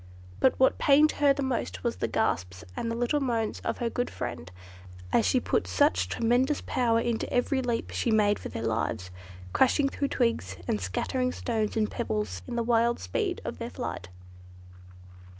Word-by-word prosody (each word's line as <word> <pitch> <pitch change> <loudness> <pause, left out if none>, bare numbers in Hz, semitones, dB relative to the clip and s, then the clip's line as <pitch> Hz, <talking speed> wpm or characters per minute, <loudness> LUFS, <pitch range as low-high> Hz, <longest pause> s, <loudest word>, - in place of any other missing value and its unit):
But 260 - +3
what 260 - +4
pained 295 +2 +5
her 290 -1 +3
most 235 - -2
were - - +1
the 90 - -3
gasps 90 +1 -1
and 230 - -2
little 245 +5 +1
moans 230 -5 -1
of - - -3
her 240 - -1
good 245 +1 -2
friend, 80 +3 -5 0.6
as 110 -4 +4
she 95 - +3
put 90 - 0
such 90 -1 +2
tremendous 245 - +2
power 230 -2 +1
into 230 -1 -1
every 265 +2 +1
leap 240 -2 -2
she - - -1
made 210 -2 +3
for - - -6
their 115 - -4
lives; 110 -5 -2 0.4
crashing 275 +2 +3
through 280 - -2
twigs, 230 - 0
and 105 - 0
scattering 250 - -1
stones 225 -4 -2
and 215 -1 +1
pebbles, 105 -4 -2
in - - -4
the 235 - 0
wild 235 0 +2
speed 90 - -2
of - - -5
their - - -4
flight. 90 - -5
230 Hz, 170 wpm, -28 LUFS, -, 0.6 s, pained